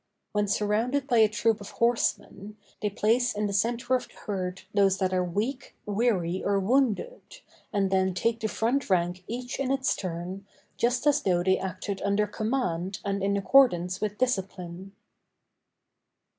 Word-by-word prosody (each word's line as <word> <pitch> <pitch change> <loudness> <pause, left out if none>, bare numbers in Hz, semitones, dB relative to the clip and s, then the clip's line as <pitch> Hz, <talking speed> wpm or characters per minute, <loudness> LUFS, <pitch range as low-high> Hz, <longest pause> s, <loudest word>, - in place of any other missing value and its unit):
When 210 0 0
surrounded 220 +7 0
by 245 -4 +2
a 220 -1 +6
troop 215 0 +1
of 200 - -8
horsemen, 215 -3 -1 0.2
they 210 - 0
place 225 +4 +1
in 210 0 -1
the 200 - -2
centre 235 +5 0
of 255 - +1
the - - -22
herd 185 -2 -4
those 195 -2 +3
that 185 -1 0
are 185 -1 +2
weak, 210 +10 -3
weary, 200 -5 0
or 200 -1 +2
wounded, 260 - +1 0.5
and 195 -2 0
then 190 -1 +2
take 230 +4 0
the 220 - -1
front 235 +5 0
rank 180 0 +1
each 245 +2 -5
in 275 -2 -1
its 265 -1 +1
turn, 185 +2 -5 0.3
just 245 +3 0
as 290 -1 +4
though 175 -2 +1
they 190 +1 +3
acted 190 +1 -4
under 200 +1 +1
command 205 -5 -2
and 200 0 -1
in 200 +1 +1
accordance 190 -6 +3
with 210 -1 -2
discipline. 190 -6 -3
205 Hz, 160 wpm, -27 LUFS, 190-235 Hz, 0.5 s, a